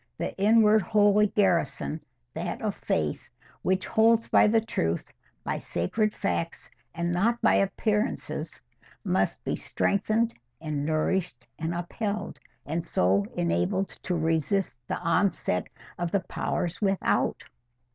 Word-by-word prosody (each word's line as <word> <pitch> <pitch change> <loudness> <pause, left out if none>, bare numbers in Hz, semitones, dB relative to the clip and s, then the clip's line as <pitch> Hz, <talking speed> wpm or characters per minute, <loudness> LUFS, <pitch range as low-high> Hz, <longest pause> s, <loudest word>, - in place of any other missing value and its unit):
—The - - -3
inward 215 +1 +5
holy 205 +2 +4
garrison, 180 -5 0 0.3
that - - -4
of - - 0
faith, 75 -1 -2 0.3
which 185 0 0
holds 225 +1 +3
by - - +5
the 225 +2 +4
truth, 85 - -2 0.3
by - - -2
sacred 215 - -1
facts, 180 -5 -3 0.2
and 170 +1 -1
not 225 +7 +1
by - - +5
appearances, 210 +3 -1 0.4
must - - 0
be - - -1
strengthened 220 +3 0 0.3
and 150 -2 -3
nourished 165 +3 -1
and 165 +1 -2
upheld, 200 +4 -3 0.3
and 160 +3 -2
so 100 - +2
enabled 85 - 0
to 180 - -2
resist 160 0 0
the - - -2
onset 170 - 0 0.3
of 175 -1 -1
the 200 +2 +1
powers 175 0 -3
without. 195 -2 +1
185 Hz, 125 wpm, -27 LUFS, 160-210 Hz, 0.4 s, inward